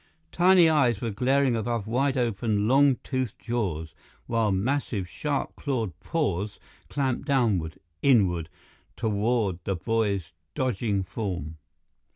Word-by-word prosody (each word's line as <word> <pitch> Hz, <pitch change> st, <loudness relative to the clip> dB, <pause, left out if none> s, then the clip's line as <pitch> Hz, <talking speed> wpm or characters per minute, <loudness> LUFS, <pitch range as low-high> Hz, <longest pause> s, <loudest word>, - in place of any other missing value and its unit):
Tiny 180 Hz, -1 st, +6 dB
eyes 135 Hz, -9 st, +3 dB
were 115 Hz, 0 st, -2 dB
glaring 130 Hz, +4 st, +2 dB
above 115 Hz, -1 st, -2 dB
wide 130 Hz, +4 st, +1 dB
open, 110 Hz, -3 st, 0 dB
long 135 Hz, +2 st, +5 dB
toothed 130 Hz, -5 st, -2 dB
jaws, 90 Hz, -10 st, -3 dB, 0.3 s
while 115 Hz, -3 st, +1 dB
massive, 105 Hz, -1 st, -1 dB
sharp 145 Hz, -, -3 dB
clawed 115 Hz, -, -2 dB
paws 105 Hz, -, -2 dB, 0.3 s
clamped 135 Hz, 0 st, -1 dB
downward, 105 Hz, -, +1 dB, 0.2 s
inward, 90 Hz, -, +3 dB, 0.5 s
toward 105 Hz, -3 st, 0 dB
the 95 Hz, -, -1 dB
boy's 100 Hz, -3 st, -1 dB, 0.2 s
dodging 110 Hz, -6 st, 0 dB
form. 90 Hz, -6 st, -4 dB
115 Hz, 115 wpm, -26 LUFS, 100-130 Hz, 0.5 s, Tiny